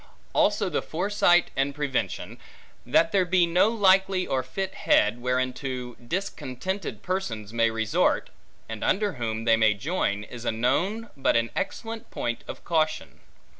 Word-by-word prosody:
Also 205 -1 +2
the 170 - -1
foresight 175 0 +2
and 140 +1 0
prevention, 145 -3 -3 0.5
that 165 0 +3
there 195 -2 +3
be 180 0 +3
no 180 +5 +3
likely 190 -3 +3
or 130 - 0
fit 190 +9 -4
head, 115 - +2
whereunto 125 0 -2
discontented 180 - -4
persons 115 - -3
may 115 0 +3
resort, 110 -1 +1 0.4
and 110 -1 -6
under 205 0 +1
whom 115 -3 -3
they 115 -1 +5
may 110 -1 +4
join, 105 - -1
is 120 +2 -9
a - - 0
known, 170 - 0
but 135 - +1
an 115 0 +1
excellent 225 -1 -4
point 120 0 -3
of - - -8
caution. 155 -2 -1
145 Hz, 145 wpm, -26 LUFS, 120-190 Hz, 0.5 s, they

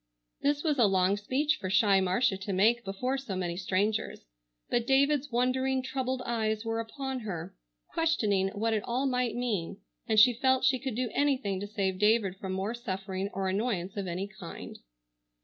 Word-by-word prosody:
This 290 +1 +1
was 300 -4 +1
a 230 - +6
long 190 0 +3
speech 265 +9 0
for 185 - -4
shy 195 0 +4
Marcia 190 +3 +2
to 195 +1 -4
make 225 +6 +3
before 250 +7 -2
so 245 -8 -5
many 175 -2 -2
strangers, 195 - -1 0.4
but 240 0 0
David's 280 +1 +3
wondering, 260 +2 +1
troubled 260 -1 -2
eyes 220 -2 -1
were 225 0 -1
upon 265 +3 -4
her, 190 -8 -6 0.4
questioning 215 -13 +1
what 225 +2 0
it 215 - +1
all 250 +3 -1
might 250 -3 0
mean, 210 -7 -2 0.3
and 220 -2 +4
she 245 +3 +7
felt 260 +2 +2
she 260 -1 +3
could 265 -4 -4
do 245 -1 -1
anything 260 -9 +1
to 205 - -5
save 195 -3 -2
David 210 -3 +3
from 190 -1 -5
more 190 +4 -2
suffering 195 -4 -4
or 195 0 -2
annoyance 195 -2 -1
of 200 -2 -3
any 180 +3 -3
kind. 195 -5 -9
220 Hz, 180 wpm, -29 LUFS, 195-255 Hz, 0.4 s, she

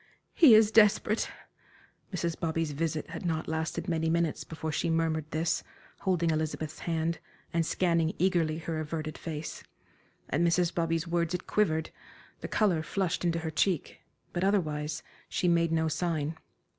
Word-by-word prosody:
"He 280 -10 +8
is 215 0 +6
desperate." 215 0 +4 0.8
Mrs. 170 -3 -1
Bobby's 165 -1 -1
visit 155 +1 -2
had - - -6
not 160 -2 -1
lasted 160 +4 -2
many 160 -2 0
minutes 170 -1 0
before 160 -1 -5
she 170 +3 0
murmured 160 -2 0
this, 160 +1 0 0.4
holding 170 -3 +1
Elizabeth's 155 0 -2
hand, 165 0 -1 0.3
and 170 0 +2
scanning 165 -1 +1
eagerly 170 -4 +2
her 160 -1 -3
averted 155 0 -4
face. 155 -2 -6 0.7
At 145 - +1
Mrs. 170 0 +2
Bobby's 165 0 0
words 170 0 0
it 180 - -5
quivered, 160 -7 +1 0.5
the - - -5
color 190 -7 +2
flushed 180 +1 -1
into 170 -1 +1
her 160 - -2
cheek; 170 0 0 0.3
but 175 - -1
otherwise 155 -7 0 0.3
she 180 - 0
made 170 -1 +3
no 160 0 +2
sign. 160 -1 -1
165 Hz, 150 wpm, -30 LUFS, 160-175 Hz, 0.8 s, He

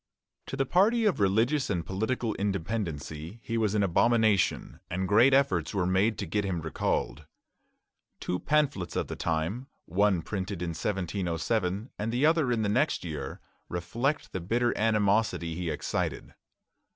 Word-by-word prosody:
To 135 - -5
the 135 - +1
party 220 - +3
of 200 - +2
religious 115 +9 +2
and 85 -5 -1
political 110 +5 -1
independency 90 - -3
he 115 - -3
was 110 -2 +1
an 105 - +3
abomination, 105 -1 +2
and 95 +2 -2
great 115 +7 +5
efforts 105 - +2
were 95 -3 +1
made 95 +5 +2
to - - -3
get 105 -1 -1
him 95 -3 -2
recalled. 80 -1 -2 0.9
Two 90 - -2
pamphlets 145 - 0
of - - -1
the - - -4
time, 85 +11 -2 0.2
one 95 -1 +2
printed 95 -2 -4
in 85 - -2
1707 95 +3 -2
and 110 +2 -1
the 125 +5 +2
other 160 -5 +3
in 115 -2 +1
the - - +1
next 125 - +1
year, 75 -5 -5 0.3
reflect 115 - -2
the 95 - -4
bitter 120 +7 +1
animosity 105 -5 +1
he 85 0 -3
excited. - - -3
105 Hz, 150 wpm, -28 LUFS, 90-120 Hz, 0.9 s, great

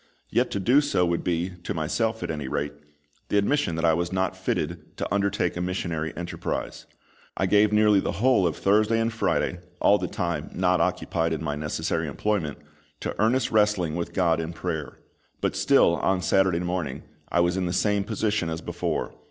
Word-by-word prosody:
Yet - - +2
to 100 - -2
do 125 +10 +4
so 145 -11 +1
would 85 -1 -1
be, 90 +1 -1
to - - -4
myself 85 +9 -1
at - - -2
any 75 -4 -4
rate, 70 +2 -2 0.6
the 105 - +2
admission 100 - +1
that 80 +1 0
I 80 - +5
was 85 +2 -1
not 95 0 0
fitted 80 0 -3
to - - -3
undertake 100 0 0
a 90 - -3
missionary 85 -3 -2
enterprise. 85 0 -4 0.5
I 95 - +1
gave 105 +2 +4
nearly 105 -1 +5
the - - -2
whole 120 -5 +3
of 80 - -2
Thursday 110 +3 +3
and 115 0 0
Friday 90 -5 0 0.2
all 105 - +4
the - - -2
time 85 -5 -3
not 90 -1 +2
occupied 85 -2 0
in 80 - -3
my 75 -2 -1
necessary 75 +1 -2
employment 95 -9 -1 0.4
to - - -3
earnest 120 +4 +2
wrestling 105 -7 +2
with 85 0 -4
GOD 85 -4 +2
in 80 +1 -4
prayer. 80 -3 -4 0.4
But - - -1
still - - +4
on 95 -1 0
Saturday 95 -3 +3
morning 90 -6 -3 0.3
I 85 - +2
was 85 +1 +2
in 95 -1 -1
the - - -1
same 100 +2 +1
position 105 -4 -1
as 80 0 -3
before. 85 -2 -3
90 Hz, 190 wpm, -25 LUFS, 80-105 Hz, 0.6 s, I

